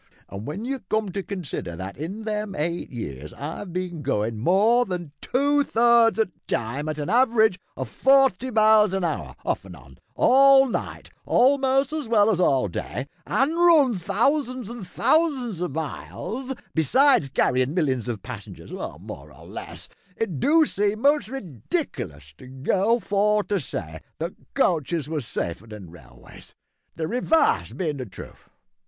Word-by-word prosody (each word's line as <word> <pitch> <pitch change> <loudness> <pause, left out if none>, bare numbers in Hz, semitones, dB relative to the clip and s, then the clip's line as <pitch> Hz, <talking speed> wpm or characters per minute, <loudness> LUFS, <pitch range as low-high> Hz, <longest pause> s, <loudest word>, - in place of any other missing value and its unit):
An' 100 - -7
w'en 150 - -5
you 270 +1 -3
come 215 -3 0
to 195 - -3
consider 180 - -5
that 95 +3 -7
in 185 - -6
them 210 -2 -3
eight 170 +3 -2
years 75 - -7
I've 165 +6 -6
bin 175 -2 -4
goin' 115 -5 -1
more 205 - +4
than 180 -7 -5
two 285 +3 +2
thirds 235 -3 +4
o' 220 - +4
the 195 - -13 0.2
time 135 +7 -2
at 155 - -3
an 145 - -3
average 220 -3 +3 0.2
o' - - -3
forty 265 -3 +3
mile 215 -3 +4
an 190 - -1
hour 85 - -3
off - - -1
an' 95 -2 -11
on 65 -3 -17 0.2
all 270 +1 +6
night 240 - -5 0.2
a'most 270 +2 +3
as 305 -5 -3
well 220 -1 +4
as 185 - 0
all 135 - +3
day, 125 +7 -5 0.2
an' 275 +4 +1
run 325 -8 +5
thousands 240 - 0
and 235 -6 -8
thousands 255 - +1
o' 180 - 0
miles, 175 - -5 0.2
besides 210 - +3
carryin' 130 +2 +1
millions 130 - 0
of 115 -5 -4
passengers, - - -9
more - - -8
or - - -15
less, - - -8 0.3
it 185 -11 -3
do 315 - +4
seem 205 -2 -1
most 290 0 +3
rediklous 130 - -5
to 130 - -12
go 190 - +1
for 210 +1 +1
to 200 -1 -1
say 80 - -6 0.2
that 165 +3 -4 0.2
coaches 165 - +1
was 150 -7 -3
safer 85 +7 -4
than 105 -6 -10
railways 75 -8 -15 0.4
the 165 - -4
revarse 250 - +2
bein' 155 -6 -2
the 130 - -5
truth. 95 - -12
195 Hz, 160 wpm, -24 LUFS, -, 0.4 s, all